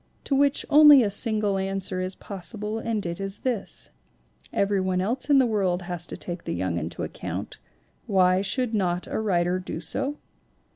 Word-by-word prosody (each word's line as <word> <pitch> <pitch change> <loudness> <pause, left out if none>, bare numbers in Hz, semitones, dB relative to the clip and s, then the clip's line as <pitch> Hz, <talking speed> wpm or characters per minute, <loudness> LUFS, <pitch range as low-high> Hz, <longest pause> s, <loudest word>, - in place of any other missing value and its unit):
To 275 - 0
which 280 0 +2
only 295 -3 +9
a 205 - 0
single 210 -2 +1
answer 190 -1 -2
is 185 +1 -3
possible 210 +3 -5
and 225 -3 -2
it 170 +1 -4
is 195 0 -4
this: 240 -6 -3 0.6
Everybody 190 -2 +1
else 240 +8 -2
in 285 - +6
the 265 - +5
world 190 -5 0
has 175 -1 -4
to - - -7
take 175 -1 -7
the - - -3
young 90 -1 -1
into 80 +1 -5
account; - - -6 0.5
why 185 -1 +3
should 240 +4 -1
not 180 -4 0
a - - -3
writer 180 -4 +1
do 180 -3 -6
so 275 - -1
195 Hz, 175 wpm, -25 LUFS, 180-225 Hz, 0.6 s, only